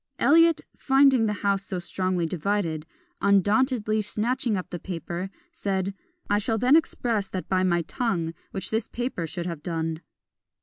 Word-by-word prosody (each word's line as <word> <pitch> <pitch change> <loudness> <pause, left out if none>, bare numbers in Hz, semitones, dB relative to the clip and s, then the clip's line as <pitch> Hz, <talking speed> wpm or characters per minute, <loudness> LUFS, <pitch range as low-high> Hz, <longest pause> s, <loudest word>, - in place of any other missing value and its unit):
Eliot, 330 +1 +5
finding 270 -4 +4
the - - +1
house 200 -1 +2
so 190 -2 -4
strongly 185 -1 -1
divided, 165 -2 -1 0.3
undauntedly 215 +2 +3
snatching 225 +2 0
up 185 - -6
the 175 - -4
paper, 175 +1 -5 0.2
said, 195 -1 -2 0.3
"I 205 0 +2
shall 225 +2 0
then 250 +6 +5
express 230 -10 +1
that 185 - -4
by 185 -1 +2
my 175 -2 +2
tongue 175 -8 -1 0.2
which 190 -2 -5
this 220 0 0
paper 240 -9 -3
should 170 +2 -5
have 170 -4 -4
done." 165 -1 -3
200 Hz, 150 wpm, -26 LUFS, 175-230 Hz, 0.3 s, Eliot